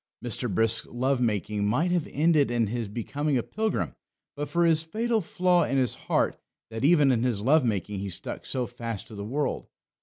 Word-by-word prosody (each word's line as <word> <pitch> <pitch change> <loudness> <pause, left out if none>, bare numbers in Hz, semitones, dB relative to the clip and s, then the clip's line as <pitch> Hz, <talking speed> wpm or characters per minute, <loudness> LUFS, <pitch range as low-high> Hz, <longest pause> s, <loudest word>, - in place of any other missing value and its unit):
Mr. 120 0 -1
Brisk's 115 +3 +1
love 130 +1 0
making 105 -2 0
might 150 +12 +1
have 175 -3 0
ended 150 -2 +3
in 120 -1 +1
his 115 +1 -3
becoming 135 +7 -1
a 120 - 0
pilgrim 220 0 -2 0.4
but 145 +1 -4
for 170 0 +3
this 160 -1 +3
fatal 220 +7 0
flaw 180 0 +2
in 135 - 0
his 130 -2 +2
heart, - - 0 0.3
that 110 +3 -5
even 150 -2 +5
in 120 -3 +1
his 120 -5 0
love 150 +4 +4
making 105 -3 -1
he 100 0 -4
stuck 85 - -6
so 125 -2 -2
fast 115 -1 -6
to - - -12
the 100 -1 -6
world. 140 +8 -2
125 Hz, 200 wpm, -27 LUFS, 110-155 Hz, 0.4 s, even